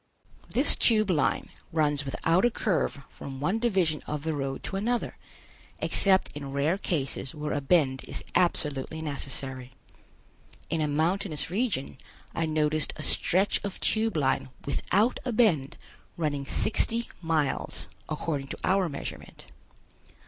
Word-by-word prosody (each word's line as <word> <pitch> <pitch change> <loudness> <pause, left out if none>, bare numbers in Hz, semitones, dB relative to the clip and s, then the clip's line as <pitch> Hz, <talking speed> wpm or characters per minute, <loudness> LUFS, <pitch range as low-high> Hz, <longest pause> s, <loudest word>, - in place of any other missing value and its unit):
This - - +4
Tube 215 -4 +4
Line 150 -5 +1 0.2
runs 150 -2 +1
without 165 +6 +2
a 240 - +6
curve 180 -10 -1
from 135 -1 -8
one 185 +10 +1
division 190 -10 +1
of 150 -1 -3
the 160 0 -1
road 135 -2 -3
to - - -4
another, 235 +5 -1 0.6
except 190 -1 +3
in 140 -2 -6
rare 150 +7 +1
cases 135 -6 -2
where 150 0 -3
a 145 - -1
bend 135 -3 +2
is - - -5
absolutely 155 -3 +1
necessary. 135 -3 -5 1.0
In 165 -1 +1
a 150 - +1
mountainous 160 +2 0
region 190 - -1 0.3
I 165 -1 0
noticed 155 -1 +1
a - - -7
stretch 190 +3 +2
of 200 -2 -4
Tube 220 -4 +1
Line 135 -2 +1 0.2
without 205 - +1
a 255 - -1
bend 185 - +2 0.4
running 145 -4 -1
sixty 230 +6 +1
miles, 160 -4 0 0.2
according 150 -2 -2
to - - -6
our 190 -2 +2
measurement. 140 - -8
155 Hz, 135 wpm, -28 LUFS, 140-190 Hz, 1.0 s, a